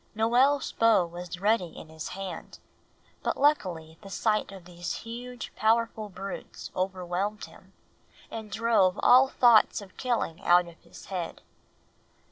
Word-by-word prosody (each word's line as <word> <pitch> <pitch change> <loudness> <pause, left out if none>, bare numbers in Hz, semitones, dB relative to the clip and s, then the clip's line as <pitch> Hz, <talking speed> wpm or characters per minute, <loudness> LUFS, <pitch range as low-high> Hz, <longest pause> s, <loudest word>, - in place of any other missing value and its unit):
Noel's 250 +6 +3
bow 225 -5 +4
was 175 +1 -8
ready 200 -4 +1
in 160 - -10
his 160 -1 -7
hand; 190 -4 -7 0.6
but - - -1
luckily 175 - 0
the 200 - -11
sight 210 +2 0
of 190 -3 -11
these 175 -1 -5
huge, 245 +1 -7
powerful 220 -1 +1
brutes 195 +1 -8
overwhelmed 185 +2 -2
him - - -18 0.6
and 220 -2 -7
drove 215 -5 +2
all 255 +2 +7
thoughts 240 -4 +4
of 200 -3 -13
killing 235 -10 -2
out 175 0 +5
of 170 -1 -14
his - - -14
head. 175 -3 -4
200 Hz, 135 wpm, -28 LUFS, 175-230 Hz, 0.6 s, all